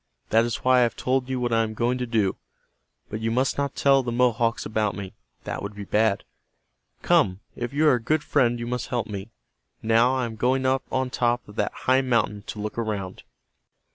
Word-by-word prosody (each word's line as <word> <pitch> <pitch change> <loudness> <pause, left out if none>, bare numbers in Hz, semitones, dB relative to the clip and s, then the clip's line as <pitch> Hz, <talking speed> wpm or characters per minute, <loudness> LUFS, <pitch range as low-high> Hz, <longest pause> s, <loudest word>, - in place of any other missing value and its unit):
That 115 +1 +4
is 120 - -4
why 130 0 +5
I - - +5
have 120 -1 +1
told 130 0 -1
you 130 -1 -1
what 120 -1 -1
I 115 - +4
am 110 -1 -3
going 120 +3 0
to 125 - -2
do. 110 -5 +1 0.8
But 110 - -3
you 110 0 -1
must 130 +4 +1
not 140 -1 -1
tell 135 -1 +4
the 120 -2 -3
Mohawks 120 -1 +1
about 105 -2 -1
me. 95 -1 -7 0.3
That - - -4
would 100 +1 -6
be 105 - -6
bad. 105 0 +1 0.8
Come, 95 +1 +3
if 120 0 -4
you 150 +2 +2
are 150 - +6
a 120 - 0
good 155 +6 0
friend 120 -4 +2
you 120 - -5
must 125 0 -3
help 120 -4 -1
me. 100 -1 -6 0.5
Now 115 +3 +4
I 130 -2 0
am 110 -1 -7
going 130 +3 +1
up 130 0 +2
on 130 -1 -1
top 120 0 0
of 105 - -13
that - - 0
high 130 +1 +4
mountain 115 -5 0
to 105 - -6
look 105 +2 -4
around." 105 -5 -3
120 Hz, 220 wpm, -25 LUFS, 110-130 Hz, 0.8 s, are